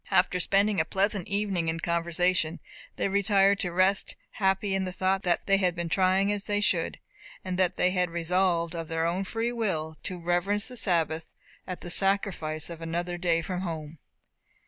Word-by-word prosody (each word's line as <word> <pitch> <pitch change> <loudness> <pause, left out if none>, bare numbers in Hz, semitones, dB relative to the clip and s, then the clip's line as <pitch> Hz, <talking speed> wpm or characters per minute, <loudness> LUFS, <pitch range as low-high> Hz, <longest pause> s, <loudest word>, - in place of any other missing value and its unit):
After 180 0 +3
spending 200 0 +2
a - - +1
pleasant 195 0 0
evening 200 -5 0
in 165 +1 -2
conversation, 170 0 0 0.4
they - - 0
retired 200 0 +3
to 180 - -2
rest, 185 +2 +2 0.2
happy 195 0 0
in 195 0 0
the 185 - -4
thought 190 +1 0
that 175 -3 0
they 195 -1 +4
had 180 -3 +1
been 170 -1 -3
trying 190 +3 +3
to - - +2
live - - 0
as 200 - -4
they 205 0 0
should, 210 - +1 0.5
and 185 -1 -2
that 185 -1 +2
they 180 - +3
had 180 -1 +1
resolved, 170 0 0
of 165 -1 -5
their 165 0 -1
own 175 +3 0
free 225 +4 -2
will, 165 -10 -2
to 185 - -5
reverence 175 +5 +1
the 250 - -6
Sabbath, 165 -7 0 0.3
at 185 -1 -5
the 175 - -5
sacrifice 185 -6 0
of 170 -1 -7
another 175 +2 -3
day 170 -2 +1
from 180 +1 -3
home. 160 -3 -6
180 Hz, 190 wpm, -27 LUFS, 170-195 Hz, 0.5 s, they